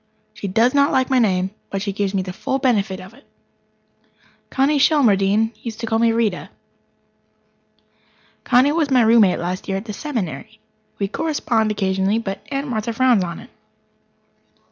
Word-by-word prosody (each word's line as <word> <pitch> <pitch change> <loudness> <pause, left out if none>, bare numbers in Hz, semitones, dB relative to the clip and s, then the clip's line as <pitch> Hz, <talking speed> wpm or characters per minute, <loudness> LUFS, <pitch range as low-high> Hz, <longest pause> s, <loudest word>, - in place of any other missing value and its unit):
She 200 - -6
does 225 +6 +2
not 280 0 +3
like 260 0 +1
my 260 - +4
name, 190 -4 +1 0.2
but 195 0 -3
she 200 -2 -3
gives 200 0 -2
me 190 - 0
the 185 -1 -7
full 265 +7 -2
benefit 215 -8 0
of 185 +3 -12
it. 275 +4 -19 1.3
Connie 280 +2 +1
Shelmardine 220 -7 +3
used 225 -2 -7
to 230 - -3
call 225 0 0
me 230 0 +3
Rita. 225 -5 -1 1.9
Connie 260 +3 +4
was 310 -2 0
my 255 -3 +4
roommate 220 -4 +4
last 180 +2 -4
year 195 -1 -1
at 195 - -7
the 215 - -6
Seminary. 220 - -5 0.4
We 200 - -1
correspond 235 -4 -1
occasionally, 195 0 0
but 195 -3 -4
Aunt 275 +1 -3
Martha 230 -2 -3
frowns 245 -4 +3
on 170 -1 -6
it. - - -16
220 Hz, 165 wpm, -20 LUFS, 195-255 Hz, 1.9 s, my